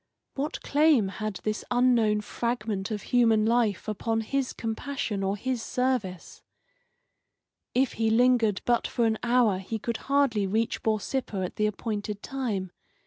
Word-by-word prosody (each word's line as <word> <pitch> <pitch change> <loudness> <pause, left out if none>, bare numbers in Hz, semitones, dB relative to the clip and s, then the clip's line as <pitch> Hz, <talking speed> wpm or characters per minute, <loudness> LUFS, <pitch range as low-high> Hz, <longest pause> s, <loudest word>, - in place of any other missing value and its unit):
What 290 +3 -4
claim 290 -8 +3
had 215 +1 -4
this 215 0 -2
unknown 240 -4 +3
fragment 215 -2 -3
of 210 -2 -4
human 225 -3 +3
life 225 -3 +1
upon 225 +1 -1
his 270 +3 -1
compassion 225 -2 -3
or 195 +1 -1
his 255 +2 -2
service? 245 -9 -2 1.3
If 260 0 +2
he 225 0 +1
lingered 230 -3 +3
but 240 -1 +2
for 235 - 0
an 220 -1 +1
hour 235 -5 +3
he 205 +4 -4
could 230 +1 -3
hardly 275 -8 +1
reach 220 +4 0
Borsippa 215 -1 -1
at - - -8
the 210 - +2
appointed 210 -1 -4
time. 220 -9 -3
225 Hz, 140 wpm, -27 LUFS, 210-250 Hz, 1.3 s, claim